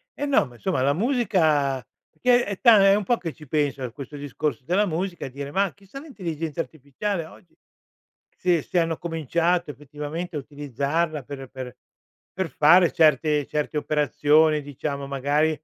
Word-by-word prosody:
eh 290 - -3
no, 280 - +3
ma 120 - -15
insomma 130 +4 -1
la 140 +2 +3
musica 160 - +1 0.3
perché 245 -1 +2
è 200 -1 -5
ta 225 -5 +7
è 195 0 +6
un 210 - 0
po' 240 +5 +1
che 165 -6 -5
ci 150 -1 -15
penso 145 -1 -1
a 125 - -4
questo 140 +3 -9
discorso 145 -3 -3
della 195 +6 +2
musica 175 +2 -3
e - - -6
dire: 140 +2 -7
"Ma 195 +1 +1
chissà 200 +6 -11
l'intelligenza 170 - -5
artificiale 165 +5 -3
oggi, 165 +2 -17 0.8
se 175 -3 +1
se 175 - 0
hanno 165 -1 0
cominciato 170 +1 0
effettivamente 150 +4 -6
a 150 - -2
utilizzarla 145 +3 -2
per 135 +1 -8
per 130 -1 -8 0.6
per 185 -3 -3
fare 170 +3 +5
certe 150 -2 +3
certe 150 0 -3
operazioni, 150 +1 +2
diciamo 140 0 -5
magari 145 +3 +1
155 Hz, 165 wpm, -24 LUFS, 145-180 Hz, 0.8 s, ta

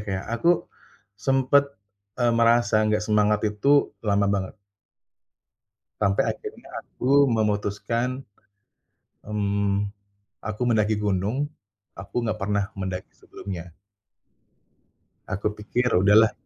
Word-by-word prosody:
kayak 95 -1 -3 0.2
aku 170 - +4 0.7
sempat, 135 +4 +3 0.5
e 125 - 0
merasa 115 -1 +4
enggak 105 0 +1
semangat 105 0 +2
itu, 140 +8 +2
lama 100 -1 +2
banget. 100 -2 -1 1.5
Sampai 100 -1 +2
akhirnya - - -8
aku 140 +3 +2
memutuskan, 105 +3 0 1.2
mmm, 100 -1 0 0.6
aku 110 +2 -5
mendaki 110 -1 +2
gunung. 100 +3 0 0.6
Aku 100 0 -14
enggak 110 -2 -2
pernah 100 0 +1 0.2
mendaki 95 -1 -4
sebelumnya. 90 -3 -9 1.5
Aku 100 +2 -2
pikir, 120 +4 -1
"Udahlah." 105 +4 +5
105 Hz, 95 wpm, -25 LUFS, 100-115 Hz, 1.5 s, Udahlah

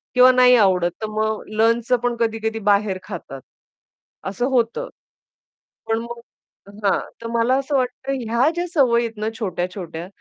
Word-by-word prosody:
किंवा 250 +1 +8
नाही 250 0 +6
आवडत, 185 -6 +3
तर 215 - -2
मग 215 0 -1
लंचचं 230 +2 +3
पण 245 -1 0
कधी-कधी 225 -1 -1
बाहेर 205 -1 +2
खातात. 165 -9 -8 0.9
असं 200 +6 -2
होतं. 255 - 0 1.0
पण 225 - +1
मग 235 +1 -7 0.7
हां. 195 - +3 0.2
तर 230 - -5
मला 235 +2 +2
असं 275 +1 -1
वाटतं 255 +1 -2 0.2
ह्या 235 +5 +3
ज्या 350 +1 -1
सवयी 240 -6 +3
आहेत 225 -2 -7
ना, 215 - 0
छोट्या-छोट्या. 180 -4 -4
225 Hz, 145 wpm, -21 LUFS, 205-250 Hz, 1.0 s, किंवा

